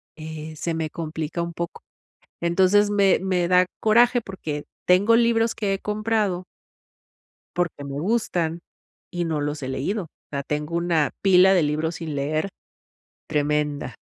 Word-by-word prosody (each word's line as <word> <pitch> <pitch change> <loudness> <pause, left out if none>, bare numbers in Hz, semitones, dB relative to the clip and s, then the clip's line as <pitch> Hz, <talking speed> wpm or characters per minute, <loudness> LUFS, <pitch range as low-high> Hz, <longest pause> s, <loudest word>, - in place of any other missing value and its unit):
eh, 155 0 -7
se 165 +2 -3
me 160 -1 -2
complica 160 +1 -4
un 170 - -5
poco. 170 0 -5 0.6
Entonces, 190 +4 +4
me 200 -2 +4
me 180 -2 +1
da 180 0 +5 0.2
coraje, 240 +3 +4
porque 160 -8 -6 0.2
tengo 200 +6 +5
libros 230 -1 +3
que 205 -3 -1
he 195 - -1
comprado 210 -3 -1 1.1
porque 170 -5 -1
me 140 0 -5
gustan 175 -4 0 0.5
y 175 -1 -2
no 160 -2 -1
los 145 0 -3
he 130 - -3
leído. 170 +10 -2
O - - -15 0.2
sea, 140 -1 -3
tengo 150 +3 -3
una 170 -3 +1
pila 190 0 +6
de 175 - +4
libros 155 +3 -1
sin 160 -3 -5
leer, 155 +6 -1 0.8
tremenda. 150 -4 -1
170 Hz, 150 wpm, -24 LUFS, 155-195 Hz, 1.1 s, pila